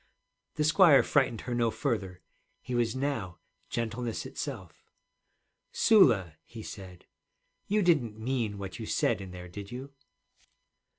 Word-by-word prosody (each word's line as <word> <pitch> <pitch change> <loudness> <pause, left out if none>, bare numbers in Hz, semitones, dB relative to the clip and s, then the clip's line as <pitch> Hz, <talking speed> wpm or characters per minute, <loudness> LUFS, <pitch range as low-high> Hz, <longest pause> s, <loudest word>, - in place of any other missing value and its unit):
The 150 - 0
squire 155 -1 +6
frightened 130 -6 +1
her 125 - -4
no 120 -1 +2
further. 105 -9 -3 0.4
He 125 - -5
was 120 -1 +1
now 130 - -2 0.3
gentleness 115 0 -3
itself. 110 - -7 0.9
'Sula,' 110 - +4
he 110 +4 -10
said, 95 -4 -10 0.6
'you 210 0 +2
didn't 135 -12 +2
mean 115 -3 -2
what 95 -2 -7
you - - -5
said - - +1
in 95 - -8
there, 90 0 -9
did 100 +3 -9
you?' 130 +3 -7
115 Hz, 130 wpm, -29 LUFS, 100-135 Hz, 0.9 s, squire